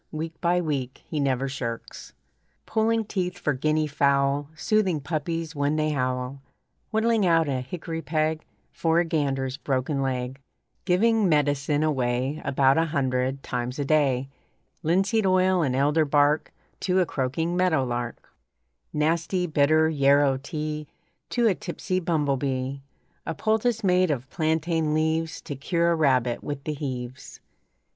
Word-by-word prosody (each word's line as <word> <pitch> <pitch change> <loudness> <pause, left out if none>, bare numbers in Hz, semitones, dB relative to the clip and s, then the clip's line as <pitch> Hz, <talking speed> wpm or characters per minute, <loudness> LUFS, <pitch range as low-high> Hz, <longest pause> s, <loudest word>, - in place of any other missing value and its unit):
Week 160 +1 -4
by 175 0 +2
week 140 -6 -3
he 155 - -3
never 135 -1 +1
shirks 120 -4 -6 0.5
Pulling 225 0 +1
teeth 180 -3 -2
for 150 -4 0
guinea 155 +4 +1
fowl, 140 0 +1
Soothing 190 -2 +1
puppies 160 +2 -3
when 145 +1 +1
they 155 0 +1
howl, 130 -1 -2 0.5
Whittling 220 -1 +2
out 165 -3 +3
a 130 -2 -1
hickory 165 +4 -5
peg 155 0 -1 0.3
For 165 0 +1
a 175 - +2
gander's 135 -4 -1
broken 135 +1 -1
leg, 130 0 -2 0.5
Giving 210 +2 +3
medicine 145 -1 +2
away 130 0 0
About 135 +1 +3
a 165 - +3
hundred 135 -3 -1
times 125 +1 -3
a 145 - -1
day, 135 -3 +2 0.5
Linseed 195 +6 +2
oil 185 -1 +3
and 130 -5 0
elder 145 +4 +3
bark 145 +1 +2 0.3
To 185 0 +1
a 185 - +3
croaking 160 +5 -2
meadowlark, 130 -10 0 0.6
Nasty, 165 +4 0
bitter 155 0 +3
yarrow 140 -2 +3
tea 150 +1 -5 0.4
To 240 -1 +1
a 215 - +5
tipsy 185 +1 -3
bumble 150 -6 0
bee, 135 0 -2 0.5
A 165 - -2
poultice 220 +3 0
made 185 -1 +3
of 130 -4 -2
plantain 160 -1 0
leaves 160 +1 0
To 145 - -6
cure 170 +5 +1
a - - +3
rabbit 130 -6 +1
with 145 -2 -5
the 155 - -2
heaves. 130 -3 -6
150 Hz, 140 wpm, -25 LUFS, 135-170 Hz, 0.6 s, a